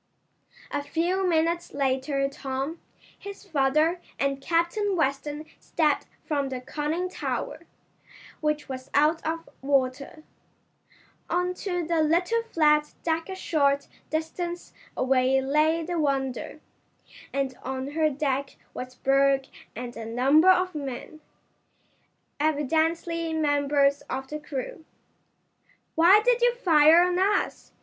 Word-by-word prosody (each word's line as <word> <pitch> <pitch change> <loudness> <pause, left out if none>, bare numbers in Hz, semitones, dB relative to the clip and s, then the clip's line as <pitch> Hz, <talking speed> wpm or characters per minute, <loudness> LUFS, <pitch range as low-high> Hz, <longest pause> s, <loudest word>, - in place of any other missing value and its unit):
A 290 - -1
few 360 +5 0
minutes 335 0 0
later 275 0 0
Tom, 275 +3 -5 0.4
his 400 0 -9
father 310 +2 +1 0.2
and 275 0 -1
Captain 345 +6 0
Weston 295 0 -1
stepped 305 -3 0 0.2
from 285 -3 -1
the 260 -1 -4
conning 305 +7 -2
tower, 365 - -4 0.7
which 300 -1 -1
was 260 -1 -7
out 305 +3 +3
of 330 +1 -3
water, 275 +2 -1 1.1
on 360 +1 0
to 360 -1 -3
the 330 0 +1
little 355 +9 +2
flat 300 -2 +3
deck 325 +1 -1
a 380 - -4
short 280 -6 +1 0.2
distance 345 +2 -4 0.2
away 260 0 +3
lay 305 +5 +2
the 345 +1 -2
Wonder, 270 -3 -2 0.7
and 275 -2 -2
on 265 +1 -4
her 310 0 +2
deck 275 -1 -2 0.2
was 255 0 -7
Berg 275 0 +2 0.3
and 240 +1 -6
a 230 - -6
number 265 +10 +4
of 370 0 +4
men, 290 +1 -6 1.2
evidently 320 +3 0
members 285 -2 +2
of 265 0 -4
the 300 - -5
crew. 295 +2 -6 1.1
"Why 350 +6 +7
did - - +3
you 485 0 +4
fire 330 -6 +6
on 360 0 0
us?" 400 +2 0
300 Hz, 120 wpm, -26 LUFS, 275-335 Hz, 1.2 s, Why